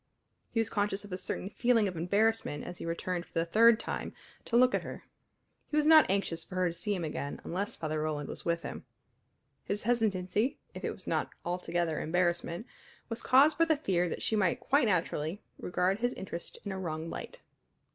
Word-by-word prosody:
He 225 Hz, -, -1 dB
was 225 Hz, -1 st, 0 dB
conscious 205 Hz, -1 st, 0 dB
of 205 Hz, -, -12 dB
a 180 Hz, -, -2 dB
certain 185 Hz, -, -4 dB
feeling 230 Hz, 0 st, +2 dB
of 185 Hz, -, -4 dB
embarrassment 200 Hz, -1 st, +1 dB
as 180 Hz, -, -8 dB
he -, -, -5 dB
returned 175 Hz, +1 st, -2 dB
for -, -, -24 dB
the 165 Hz, -, +2 dB
third 225 Hz, +5 st, +6 dB
time -, -, -4 dB, 0.3 s
to 235 Hz, -, +2 dB
look 255 Hz, +1 st, +5 dB
at -, -, +2 dB
her. -, -, -8 dB, 0.7 s
He 300 Hz, -, 0 dB
was 300 Hz, -, +3 dB
not 315 Hz, 0 st, +8 dB
anxious 185 Hz, -4 st, 0 dB
for 185 Hz, -, -10 dB
her 185 Hz, -1 st, +2 dB
to -, -, -5 dB
see 205 Hz, +4 st, -2 dB
him 180 Hz, -, -3 dB
again 145 Hz, -2 st, -4 dB
unless 195 Hz, +4 st, -3 dB
Father 155 Hz, -1 st, -2 dB
Roland 150 Hz, -2 st, -2 dB
was -, -, -7 dB
with 170 Hz, 0 st, 0 dB
him. -, -, -6 dB, 0.8 s
His 205 Hz, +1 st, -2 dB
hesitancy, 215 Hz, -1 st, +1 dB, 0.2 s
if -, -, -8 dB
it -, -, -2 dB
was -, -, -11 dB
not -, -, 0 dB, 0.2 s
altogether 175 Hz, -2 st, -1 dB
embarrassment, 175 Hz, +3 st, 0 dB, 0.4 s
was 230 Hz, -, -4 dB
caused 285 Hz, +5 st, +5 dB
by 330 Hz, -, +6 dB
the 315 Hz, -2 st, +2 dB
fear 180 Hz, -, +1 dB
that -, -, -4 dB
she 220 Hz, -, +1 dB
might 205 Hz, +3 st, +2 dB
quite 270 Hz, +1 st, +3 dB
naturally 175 Hz, -1 st, -1 dB, 0.2 s
regard 180 Hz, +3 st, 0 dB
his 245 Hz, +1 st, 0 dB
interest 175 Hz, -2 st, -6 dB
in 200 Hz, -, -3 dB
a 190 Hz, -, -4 dB
wrong 160 Hz, -3 st, -3 dB
light. -, -, -7 dB
190 Hz, 205 wpm, -31 LUFS, 170-225 Hz, 0.8 s, not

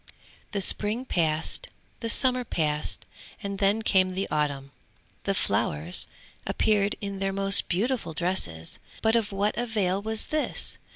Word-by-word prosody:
The 200 Hz, -, 0 dB
spring 215 Hz, +6 st, +1 dB
passed, 160 Hz, -, -1 dB, 0.3 s
the 230 Hz, -, -4 dB
summer 255 Hz, +1 st, +3 dB
passed, 150 Hz, -8 st, -1 dB, 0.4 s
and 200 Hz, -1 st, -4 dB
then 205 Hz, +3 st, +2 dB
came 185 Hz, -3 st, +3 dB
the 190 Hz, +1 st, -3 dB
autumn. 140 Hz, -2 st, -1 dB, 0.5 s
The -, -, 0 dB
flowers 80 Hz, +4 st, +1 dB, 0.4 s
appeared 205 Hz, -2 st, +2 dB
in 200 Hz, -1 st, -5 dB
their 195 Hz, 0 st, -1 dB
most 195 Hz, 0 st, +7 dB
beautiful 200 Hz, -2 st, -1 dB
dresses, 150 Hz, -, -2 dB, 0.2 s
but 220 Hz, +1 st, +3 dB
of 225 Hz, -3 st, +1 dB
what 200 Hz, +2 st, 0 dB
avail 205 Hz, -5 st, 0 dB
was 220 Hz, +1 st, -3 dB
this? 310 Hz, -, -2 dB
195 Hz, 135 wpm, -26 LUFS, 170-220 Hz, 0.5 s, most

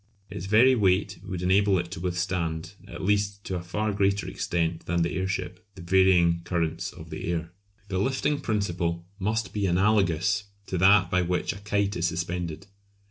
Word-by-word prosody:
Its 90 Hz, -, -6 dB
very 115 Hz, +6 st, +6 dB
weight 100 Hz, -3 st, +1 dB
would 95 Hz, -3 st, -5 dB
enable 95 Hz, +1 st, +3 dB
it 85 Hz, -1 st, -3 dB
to 95 Hz, -, -6 dB
withstand, 90 Hz, -1 st, -2 dB
at -, -, -8 dB
least 100 Hz, 0 st, 0 dB
to 95 Hz, -, -4 dB
a 90 Hz, -, -3 dB
far 105 Hz, +5 st, -2 dB
greater 100 Hz, 0 st, +1 dB
extent 85 Hz, -1 st, -2 dB
than 85 Hz, 0 st, +1 dB
the 85 Hz, +1 st, -1 dB
airship, 95 Hz, -1 st, -3 dB
the 95 Hz, -, -10 dB
varying 90 Hz, -2 st, +4 dB
currents 85 Hz, -3 st, -2 dB
of -, -, -12 dB
the -, -, -5 dB
air. 85 Hz, -1 st, -3 dB, 0.4 s
The 95 Hz, -2 st, -2 dB
lifting 135 Hz, +6 st, 0 dB
principle 85 Hz, -7 st, -1 dB
must 110 Hz, +3 st, -1 dB
be 100 Hz, -2 st, 0 dB
analogous 95 Hz, 0 st, +2 dB, 0.2 s
to 95 Hz, -, -3 dB
that 95 Hz, 0 st, +5 dB
by 90 Hz, -, +3 dB
which 90 Hz, 0 st, -1 dB
a 100 Hz, -, -10 dB
kite 100 Hz, -1 st, -1 dB
is 85 Hz, 0 st, +1 dB
suspended. 85 Hz, 0 st, -3 dB
95 Hz, 175 wpm, -26 LUFS, 85-100 Hz, 0.4 s, very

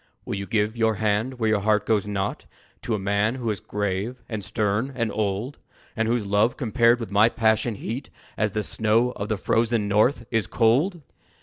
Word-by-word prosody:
"Will -, -, -4 dB
you 100 Hz, 0 st, -4 dB
give 105 Hz, +2 st, 0 dB
your 110 Hz, -1 st, +2 dB
hand 110 Hz, +5 st, 0 dB
where 110 Hz, -2 st, +1 dB
your 110 Hz, -1 st, +2 dB
heart 105 Hz, 0 st, +1 dB
goes 105 Hz, -2 st, +1 dB
not 100 Hz, 0 st, -3 dB, 0.3 s
To 115 Hz, -, -1 dB
a -, -, -1 dB
man 100 Hz, +4 st, 0 dB
who 120 Hz, -4 st, -2 dB
is 100 Hz, -, -4 dB
grave 105 Hz, +4 st, -3 dB
and 110 Hz, -3 st, -5 dB
stern 110 Hz, +6 st, -1 dB
and 115 Hz, -4 st, -1 dB
old; 105 Hz, +6 st, -2 dB, 0.4 s
And 110 Hz, 0 st, 0 dB
whose 115 Hz, -2 st, 0 dB
love 105 Hz, +4 st, +2 dB
compared 120 Hz, -1 st, +3 dB
with 115 Hz, -4 st, -6 dB
my 105 Hz, +3 st, +5 dB
passion 115 Hz, 0 st, +1 dB
heat, 120 Hz, +6 st, -5 dB, 0.3 s
As 105 Hz, -2 st, 0 dB
the 105 Hz, -, -1 dB
snow 110 Hz, +4 st, +1 dB
of 105 Hz, -3 st, -6 dB
the 110 Hz, -, 0 dB
frozen 115 Hz, 0 st, +1 dB
North, 110 Hz, +5 st, +2 dB
is 115 Hz, -5 st, 0 dB
cold?" 145 Hz, -, +2 dB
110 Hz, 195 wpm, -24 LUFS, 105-120 Hz, 0.4 s, my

